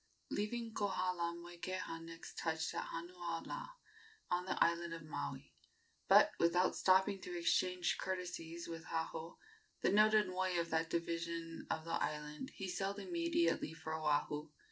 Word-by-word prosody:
Leaving 225 +2 -2
Kohala, 180 -4 0
Moikeha 175 0 -4
next 165 0 -9
touched 160 0 -1
at 170 - -2
Hanuaula, 175 - -4 0.6
on 180 0 +2
the 190 - -1
island 170 0 +2
of 165 - -8
Maui; 70 - -5 0.5
but, - - +8
without 175 +2 +4
stopping 190 +1 +4
to 360 -1 -4
exchange 185 - +2
courtesies 175 -3 -3
with 165 -1 -6
Haho, 165 0 -3 0.4
the - - +3
noted 215 0 +6
moi 185 -1 0
of 170 0 -2
that 160 0 +1
division 165 0 -2
of 160 - -1
the 165 - -4
island, 150 +9 -3
he 195 - -4
sailed 195 +2 -1
immediately 335 - +1
for 160 -1 -5
Oahu. 150 0 0
170 Hz, 140 wpm, -38 LUFS, 165-190 Hz, 0.6 s, but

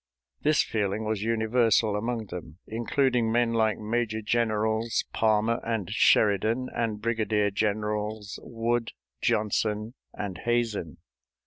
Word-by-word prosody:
This 150 0 +3
feeling 105 0 -1
was 110 -2 -1
universal 110 -1 +2
among 115 +1 -2
them, 85 -2 -7
including 120 +1 +1
men 120 0 +2
like 110 -1 +2
Major 110 0 -2
Generals 110 0 0
Palmer 110 +1 +2
and 110 -5 -2
Sheridan 110 +3 +3
and 110 -3 -1
Brigadier 105 -2 +1
Generals 105 0 -2
Wood, 115 0 -2 0.3
Johnson, 105 +1 0 0.2
and 95 -3 -5
Hazen. 115 - -1
110 Hz, 110 wpm, -27 LUFS, 105-115 Hz, 0.3 s, This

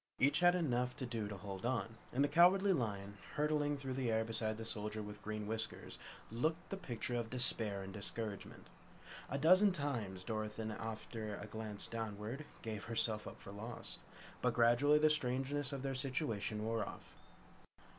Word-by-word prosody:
Each 140 +3 +4
had 175 0 +6
enough 125 -7 +1
to 130 - -4
do 115 -3 -2
to 100 -1 -5
hold 95 -1 -6
on, 115 -2 -1
and 135 +3 +2
the - - +4
Cowardly 190 +5 +6
Lion, 100 - -2 0.2
hurtling 150 -1 +1
through 135 -2 -4
the 130 -3 0
air 110 0 +2
beside 110 -1 -1
the 115 - -6
Soldier 105 -1 -3
with 105 0 -8
Green 110 0 -4
Whiskers, 110 +1 -4 0.3
looked 160 +9 -1
the - - 0
picture 125 -9 -4
of 120 -2 -1
despair 110 -5 +3
and 95 0 -7
discouragement. 105 0 -5 0.6
A 140 - -1
dozen 185 +7 +6
times 120 - -2
Dorothy, 110 +1 -3
after 110 -1 -5
a 100 - -7
glance 110 -1 -5
downward, 115 +5 -4 0.2
gave 110 -2 -4
herself 110 -2 +1
up - - -9
for 100 - -10
lost. 110 +4 -7 0.4
But 125 -2 +2
gradually 120 +5 +5
the 155 0 +5
strangeness 135 0 +2
of 135 -2 -4
their 135 -1 -1
situation 125 -6 -1
wore 115 0 0
off. - - -9
115 Hz, 170 wpm, -37 LUFS, 105-140 Hz, 0.6 s, had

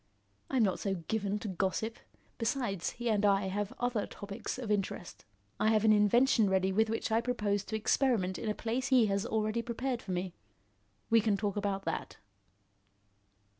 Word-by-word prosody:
I'm 260 -4 +3
not 190 -3 +1
so 195 -2 -1
given 200 +4 -2
to 210 - -6
gossip. 195 +4 -2 0.4
Besides, 225 -6 -1
he 240 0 -5
and 210 -1 +1
I 200 -1 +3
have 205 +1 -2
other 245 -3 0
topics 200 +3 -6
of 240 -5 -4
interest. 195 -3 -3 0.3
I 215 - +2
have 220 0 +3
an 215 - +7
invention 215 +1 +4
ready 190 0 +2
with 220 +3 +2
which 225 0 -2
I 225 +1 +3
propose 210 -5 -1
to 220 - -4
experiment 215 -4 +1
in 220 - -3
a 210 - -1
place 235 +3 -2
he 255 -4 +5
has 200 -1 0
already 215 +1 0
prepared 240 +1 -3
for 190 - -7
me. 180 0 -2 0.8
We 230 0 +6
can 210 -2 +1
talk 205 -1 -2
about 200 -1 -2
that." 165 - -3
210 Hz, 175 wpm, -32 LUFS, 195-230 Hz, 0.8 s, an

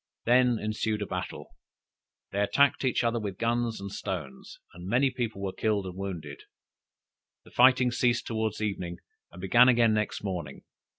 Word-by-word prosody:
Then 125 0 +4
ensued 110 0 -2
a - - -3
battle; 90 -1 -6 0.8
they 100 - -2
attacked 140 +9 +3
each 130 -1 +1
other 115 0 +1
with 100 -4 -5
guns 115 -1 -1
and 100 0 -7
stones, 80 -10 -6 0.2
and 90 +1 -10
many 130 +6 +2
people 115 -5 -4
were 95 -1 -3
killed 105 -3 0
and 90 -1 -7
wounded. 85 -7 -6 1.1
The - - -17
fighting 125 0 +5
ceased 120 0 +1
towards 110 -2 -2
evening, 90 -4 -3 0.3
and 90 - -12
began 120 +7 +5
again 120 -3 +4
next 105 -1 -2
morning. 85 -8 -5
110 Hz, 160 wpm, -28 LUFS, 95-120 Hz, 1.1 s, fighting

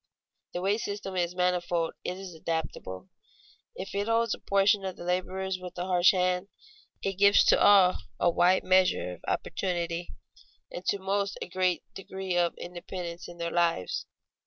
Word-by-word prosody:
The 175 - -3
wage 205 +3 +1
system 200 -2 -4
is 175 -1 -1
manifold, 175 -2 0
it 180 - -3
is 190 -2 -8
adaptable. 160 - -4 0.7
If 190 - -7
it 200 +1 -1
holds 230 0 +2
a - - -6
portion 200 0 +3
of 190 -1 -4
the - - -9
laborers 185 +1 -2
with 180 -1 -9
a 175 - -2
harsh 180 0 +5
hand, 180 0 +1 0.6
it 195 -1 -2
gives 200 0 +7
to - - +5
all 195 -3 +6 0.2
a 175 - +3
wide 180 +2 +3
measure 185 - +3
of - - -13
opportunity, 175 -2 -2 0.6
and 175 - -6
to - - +2
most 200 +1 -1
a - - -5
great 185 0 0
degree 190 -1 -5
of 175 -1 +1
independence 175 -1 -7
in 175 - -11
their 170 0 -3
lives. 170 - 0
180 Hz, 165 wpm, -28 LUFS, 175-195 Hz, 0.7 s, gives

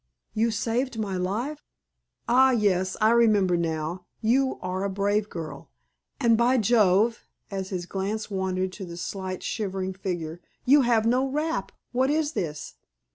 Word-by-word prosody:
"You 225 +2 +2
saved 230 +3 -1
my 205 -3 -2
life? 225 +12 -2 0.7
Ah, 260 +2 +6
yes! 190 -6 +1
I 215 +1 +4
remember 210 -6 +4
now. 165 +1 -2
You 260 +4 +2
are 185 +1 -3
a 200 - 0
brave 205 +2 0
girl. 155 -5 -7 0.5
And, 235 -4 +4
by 240 +3 +3
Jove!" 220 0 +3 0.2
as 190 -1 -4
his 180 -3 -3
glance 205 +4 -3
wandered 190 -1 -1
to 190 +1 -7
the 170 -1 -8
slight, 185 0 -5
shivering 190 -3 -3
figure 175 -3 -4 0.2
"you 280 +3 +6
have 235 -3 +3
no 250 +3 +2
wrap. 305 +4 -2 0.2
What 260 +2 +2
is 305 0 +1
this?" 155 - -4
205 Hz, 150 wpm, -26 LUFS, 185-235 Hz, 0.7 s, Ah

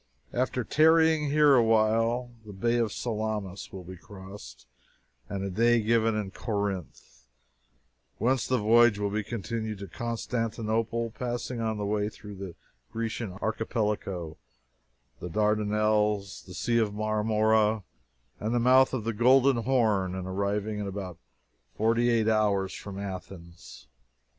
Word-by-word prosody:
After 125 0 0
tarrying 160 +1 +4
here 150 0 +5
awhile, 115 +1 +2
the 105 -1 -10
Bay 115 +5 0
of 115 -3 0
Salamis 105 -5 -4
will 95 -1 -8
be 90 +1 -10
crossed, 95 - -12 0.6
and 100 -1 -3
a 100 - -2
day 120 +4 +3
given 115 0 +2
to 105 -3 -3
Corinth, 95 - -5 0.9
whence 125 +1 +1
the 130 - +2
voyage 115 0 +5
will 100 -1 -1
be 105 +1 -1
continued 110 0 -4
to 100 0 -8
Constantinople, 115 0 -2
passing 120 +1 -4
on 110 -1 -1
the 105 - -3
way 105 0 0
through 105 -1 -11
the 95 -3 -8 0.4
Grecian 115 -3 -4
Archipelago, 105 -5 -2 0.8
the 90 - -6
Dardanelles, 105 0 +1
the 90 - -9
Sea 115 -1 +1
of 105 -2 0
Marmora, 110 0 +2 0.6
and 110 +3 -1
the - - +3
mouth 130 +2 +5
of 120 - -3
the 115 +1 -2
Golden 130 +4 +4
Horn, 110 -7 +1
and 95 -1 -5
arriving 100 +2 -2
in 105 - -3
about 95 -3 -6 0.6
forty 115 +2 +2
eight 115 -2 +2
hours 105 -3 +1
from 100 -1 -8
Athens. 90 -8 -9
110 Hz, 135 wpm, -28 LUFS, 100-115 Hz, 0.9 s, here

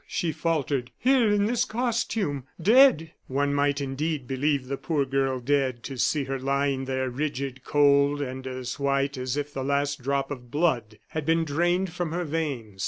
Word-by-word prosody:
she 170 - -1
faltered, 145 -6 -1
"here 250 -3 +3
in 205 0 +3
this 235 +2 +1
costume 225 - -1 0.2
dead!" 205 - +5 0.2
One 140 +2 0
might 145 0 +1
indeed 140 +1 -2
believe 135 +1 0
the 140 - -2
poor 140 +1 -1
girl 135 -1 0
dead, 130 -2 0
to 135 - -6
see 150 +3 +2
her 135 0 -3
lying 135 0 0
there 130 0 -1
rigid, 135 -1 -3
cold, 145 0 +3
and 130 -1 -5
as 130 0 -5
white 140 0 +1
as 130 +1 -3
if 145 0 -3
the 135 - -3
last 140 +1 0
drop 140 +2 -1
of 125 -3 -7
blood 120 -8 0
had 155 - -3
been 165 +2 +2
drained 175 +4 0
from 175 -2 -3
her 175 +1 -1
veins. 140 -11 -3
140 Hz, 175 wpm, -26 LUFS, 135-160 Hz, 0.2 s, dead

